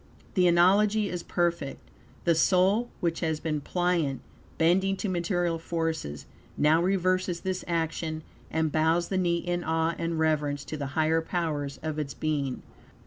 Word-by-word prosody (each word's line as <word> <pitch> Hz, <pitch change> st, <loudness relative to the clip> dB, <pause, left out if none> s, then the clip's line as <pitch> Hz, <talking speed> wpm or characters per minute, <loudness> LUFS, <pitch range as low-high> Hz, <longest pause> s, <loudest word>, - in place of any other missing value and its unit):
The 180 Hz, -2 st, +4 dB
analogy 200 Hz, +4 st, +4 dB
is 175 Hz, -1 st, -3 dB
perfect. 170 Hz, -5 st, -1 dB, 0.4 s
The 170 Hz, -, +4 dB
soul, 190 Hz, +7 st, +3 dB
which 170 Hz, -2 st, 0 dB
has 160 Hz, -2 st, -1 dB
been 155 Hz, -2 st, -2 dB
pliant, 175 Hz, -4 st, 0 dB, 0.4 s
bending 190 Hz, +4 st, +3 dB
to 205 Hz, -, -3 dB
material 175 Hz, -2 st, 0 dB
forces, 160 Hz, -, -3 dB, 0.3 s
now 155 Hz, +2 st, +4 dB
reverses 185 Hz, -1 st, +1 dB
this 185 Hz, -1 st, -2 dB
action, 160 Hz, -1 st, -2 dB, 0.3 s
and 160 Hz, -1 st, 0 dB
bows 160 Hz, +3 st, +2 dB
the 190 Hz, -, 0 dB
knee 170 Hz, -2 st, +2 dB
in 175 Hz, 0 st, -2 dB
awe 160 Hz, +1 st, +1 dB
and 165 Hz, 0 st, -1 dB
reverence 150 Hz, -3 st, 0 dB
to -, -, -5 dB
the 140 Hz, -2 st, -3 dB
higher 160 Hz, +1 st, +3 dB
powers 155 Hz, -5 st, -2 dB
of 155 Hz, -1 st, -2 dB
its 140 Hz, -2 st, -4 dB
being. 145 Hz, -4 st, -2 dB
165 Hz, 150 wpm, -28 LUFS, 155-180 Hz, 0.4 s, The